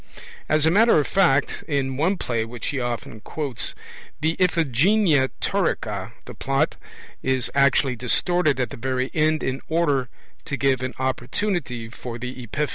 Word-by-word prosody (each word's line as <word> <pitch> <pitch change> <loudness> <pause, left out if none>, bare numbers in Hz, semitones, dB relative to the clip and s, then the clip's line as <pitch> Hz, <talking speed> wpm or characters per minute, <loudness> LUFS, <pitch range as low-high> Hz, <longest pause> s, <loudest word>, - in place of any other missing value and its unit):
As 155 0 +3
a 160 - +4
matter 225 +3 +5
of 145 - +1
fact, 170 -8 +2
in 135 -4 0
one 175 +8 +1
play 115 -7 -1
which 120 +1 -5
he 140 - -2
often 120 -3 -4
quotes, 130 -2 -4 0.4
the 160 +2 +1
Iphigenia 165 - +3
Taurica, - - -1
the - - -9
plot - - 0 0.5
is 130 -2 0
actually 140 -1 +3
distorted 150 +5 +1
at 125 - -1
the - - -7
very 130 +1 -1
end 155 0 +2
in 130 +1 -2
order 145 -6 +1 0.4
to 140 - -3
give 135 -2 +2
an 130 0 -4
opportunity 130 - -2
for 115 +1 -7
the 125 +1 -6
epiphany. 140 +5 -2
135 Hz, 155 wpm, -23 LUFS, 125-160 Hz, 0.5 s, matter